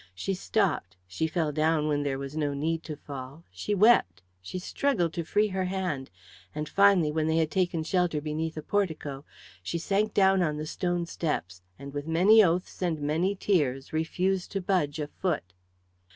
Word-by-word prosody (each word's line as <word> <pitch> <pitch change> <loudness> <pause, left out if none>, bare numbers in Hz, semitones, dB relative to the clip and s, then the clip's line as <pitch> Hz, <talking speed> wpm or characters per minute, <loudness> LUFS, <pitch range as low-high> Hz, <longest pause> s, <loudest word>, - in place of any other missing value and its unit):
She 195 - -2
stopped, 180 - -1
she 95 - -2
fell 160 -2 -1
down 155 0 +1
when 145 -1 +1
there 140 -2 -1
was 140 +1 -6
no 145 -2 -1
need 160 +3 -1
to 155 - -5
fall, 140 +1 -9
she 205 - -2
wept, 210 - +4 0.2
she 95 - -6
struggled 185 - 0
to 170 - -2
free 210 +6 +1
her 190 -1 -1
hand, 180 -8 -3 0.5
and 150 0 -3
finally, 195 -5 +4
when 155 0 0
they 160 0 +2
had 160 -1 +1
taken 175 -2 0
shelter 175 -2 +1
beneath 155 +2 -3
a 155 - -4
portico, 155 -8 -2 0.4
she 90 - -3
sank 200 +5 0
down 190 -1 +4
on 155 -3 0
the 155 - -4
stone 175 +1 -1
steps, 95 - -3 0.2
and 140 0 -9
with 145 +1 -4
many 195 +7 +6
oaths 180 +1 -1
and 170 -4 0
many 160 +7 0
tears 145 -10 0
refused 180 +4 -1
to 195 - 0
budge 180 -6 0
a 150 - -2
foot. 150 - -3
160 Hz, 180 wpm, -28 LUFS, 145-185 Hz, 0.5 s, many